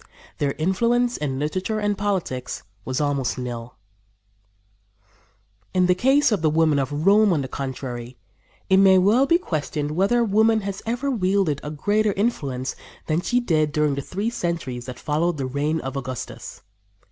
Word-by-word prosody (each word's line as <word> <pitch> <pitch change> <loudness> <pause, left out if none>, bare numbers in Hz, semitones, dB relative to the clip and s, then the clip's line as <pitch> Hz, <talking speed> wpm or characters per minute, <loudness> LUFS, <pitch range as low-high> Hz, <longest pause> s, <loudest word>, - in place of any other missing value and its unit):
Their 140 -1 0
influence 235 +8 +1
in 135 -3 -3
literature 185 +9 -2
and 205 -1 0
politics 190 -11 -3 0.2
was 130 0 -2
almost 140 -4 0
nil. 120 -1 -6 2.0
In 185 -1 +4
the 180 - +4
case 265 +8 +3
of 205 -6 +1
the 160 - +3
women 155 -2 +3
of 145 +4 -2
Rome, 205 +1 +5
on 150 -5 +1
the - - -4
contrary, 125 -2 -6 0.5
it 190 - +4
may 190 -1 +6
well 215 +9 +4
be 335 - +5
questioned 150 - -3
whether 200 +9 +2
woman 220 +1 +3
has 195 -1 -5
ever 245 +4 -1
wielded 190 - +1
a 150 - -4
greater 205 +8 +1
influence 140 - -2 0.3
than 160 +2 0
she 245 +6 +1
did 155 -10 +1
during 150 -1 +1
the 140 - -3
three 200 - -3
centuries 155 - -3
that 125 - -7
followed 155 +2 0
the 135 - -2
reign 145 +5 -1
of 135 +1 -5
Augustus. 130 -2 -6
165 Hz, 160 wpm, -23 LUFS, 140-205 Hz, 2.0 s, may